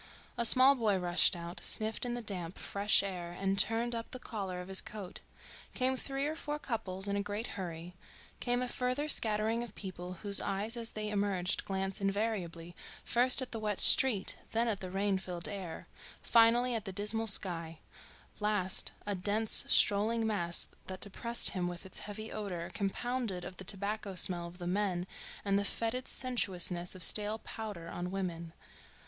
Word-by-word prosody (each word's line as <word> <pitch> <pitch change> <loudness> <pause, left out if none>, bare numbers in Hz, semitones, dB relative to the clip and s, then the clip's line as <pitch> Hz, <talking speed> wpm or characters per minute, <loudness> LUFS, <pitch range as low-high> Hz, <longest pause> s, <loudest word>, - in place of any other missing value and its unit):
A 235 - 0
small 255 +4 +9
boy 220 -7 0
rushed 180 +1 +3
out, 170 0 -8
sniffed 220 +3 -2
in 240 - -3
the 240 - -6
damp, 180 -4 -2
fresh 200 0 +1
air 175 -3 -6
and 195 0 0
turned 230 +2 +2
up 230 0 -6
the 255 - -7
collar 195 -7 -6
of 180 - -8
his 190 0 +4
coat; 205 -4 -6 0.6
came 260 +1 +1
three 270 +1 -4
or 305 +2 -3
four 295 -2 -5
couples 205 -8 -3
in 200 - -2
a 200 - -1
great 205 +2 -4
hurry; 175 -2 -7 0.5
came 245 0 0
a - - -3
further 250 +4 -2
scattering 220 -3 +3
of 235 -4 -8
people 180 -2 -7
whose 200 -1 +3
eyes 205 +4 -3
as 230 -1 -4
they 215 0 -4
emerged 200 -3 -1
glanced 195 0 -3
invariably, 195 -5 -3 0.3
first 255 +2 +4
at 255 - -9
the 225 - -5
wet 210 -2 -2
street, 230 -8 +8 0.2
then 230 +1 +1
at 210 -4 -2
the 185 - -7
rain 195 +1 -1
filled 175 -2 -6
air, 185 -5 -7 0.4
finally 240 +2 +4
at 225 -3 -3
the 195 - -5
dismal 210 +4 -1
sky; 170 -5 0 0.6
last 210 -3 +2
a 205 - -2
dense, 205 +4 +1
strolling 220 +3 +3
mass 175 -6 +2 0.2
that 185 -1 -7
depressed 235 +4 +4
him 180 -2 -2
with 175 0 -7
its 190 - -2
heavy 215 +2 -7
odor 185 -5 -5
compounded 210 -1 -3
of 185 - -9
the - - -8
tobacco 200 +1 -3
smell 175 -1 +3
of 175 +1 -13
the 175 - -8
men 180 -1 -1 0.4
and 200 0 +1
the - - -1
fetid 230 +5 -2
sensuousness 185 -8 -2
of 185 - -3
stale 210 +3 +2
powder 210 -7 -7
on 175 +1 -5
women. 175 -3 -5
200 Hz, 180 wpm, -32 LUFS, 185-225 Hz, 0.6 s, small